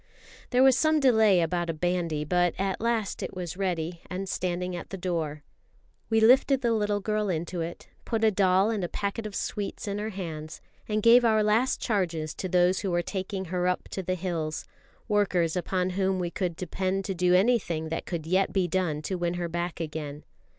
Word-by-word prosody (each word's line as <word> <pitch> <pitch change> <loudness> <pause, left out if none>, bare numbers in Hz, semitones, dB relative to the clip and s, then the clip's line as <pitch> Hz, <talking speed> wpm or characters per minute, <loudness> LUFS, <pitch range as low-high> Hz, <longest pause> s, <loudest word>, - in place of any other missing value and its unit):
There 250 +1 +4
was 265 -1 +6
some 310 +2 +3
delay 220 -9 +5
about 175 +1 -1
a 165 - -1
bandy, 170 -2 -1
but 175 +2 +2
at 195 0 -1
last 230 -3 -1
it - - -5
was 180 -1 -5
ready 175 -3 -2
and 185 +2 -4
standing 180 -1 -2
at 175 - -7
the 195 - -5
door. 160 -5 -3 0.7
We 225 -1 +3
lifted 260 +4 +5
the 235 -2 +2
little 210 -2 0
girl 210 0 -1
into 170 0 -2
it, 165 +1 -6 0.2
put 225 -2 -2
a 220 - +5
doll 190 +1 +3
and 210 -4 -2
a 175 - -2
packet 205 +2 -3
of 205 - -9
sweets 205 0 -4
in 200 0 -2
her 215 +1 -3
hands, 160 -6 -6 0.3
and 210 0 0
gave 240 +2 +7
our 220 -2 +4
last 220 +5 +2
charges 170 -8 -1
to 185 - -5
those 180 +1 +3
who 195 - -2
were 175 -1 +1
taking 190 +1 -4
her 180 0 +1
up 180 - -1
to 190 - -4
the 185 0 -1
hills, 165 -4 -3 0.4
workers 185 -6 +1
upon 180 +1 -1
whom 190 0 0
we 175 -2 -2
could 180 -3 -2
depend 185 +2 -2
to 195 - -2
do 180 0 +3
anything 185 -6 +2
that 165 - -4
could 170 -4 -4
yet 185 +4 +2
be 190 -2 +1
done 160 -4 -1
to 185 +3 -3
win 175 0 -1
her 175 -1 -2
back 175 +1 -3
again. 150 -2 -5
185 Hz, 205 wpm, -27 LUFS, 170-205 Hz, 0.7 s, gave